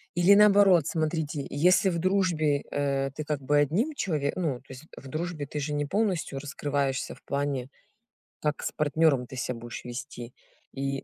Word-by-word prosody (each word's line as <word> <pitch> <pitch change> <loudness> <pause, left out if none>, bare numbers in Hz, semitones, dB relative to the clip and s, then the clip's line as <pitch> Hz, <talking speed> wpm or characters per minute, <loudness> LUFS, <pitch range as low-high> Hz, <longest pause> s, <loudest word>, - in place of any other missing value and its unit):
Или 175 +3 +6
наоборот, 200 -5 +6
смотрите: 155 -2 -2
если 180 +7 +3
в 170 -2 -1
дружбе, 170 -6 +1
э, 135 -1 0
ты 155 +2 -6
как 150 -2 -2
бы 145 +2 +2
одним 180 - +1
челове 155 - -1
ну, 150 -9 -1
то - - -34
есть 130 +4 -11
в 135 - -11
дружбе 155 0 -4
ты 150 +2 -5
же 150 +1 -3
не 145 0 0
полностью 185 -5 -1
раскрываешься 140 -2 -2
в - - -22
плане, 140 -2 -2 0.7
как 150 -1 -1
с - - -2
партнёром 150 -4 +2
ты 130 - -9
себя 125 -1 -3
будешь 120 +1 -8
вести. 120 0 -7 0.4
И 135 0 -3
145 Hz, 175 wpm, -27 LUFS, 135-170 Hz, 0.7 s, Или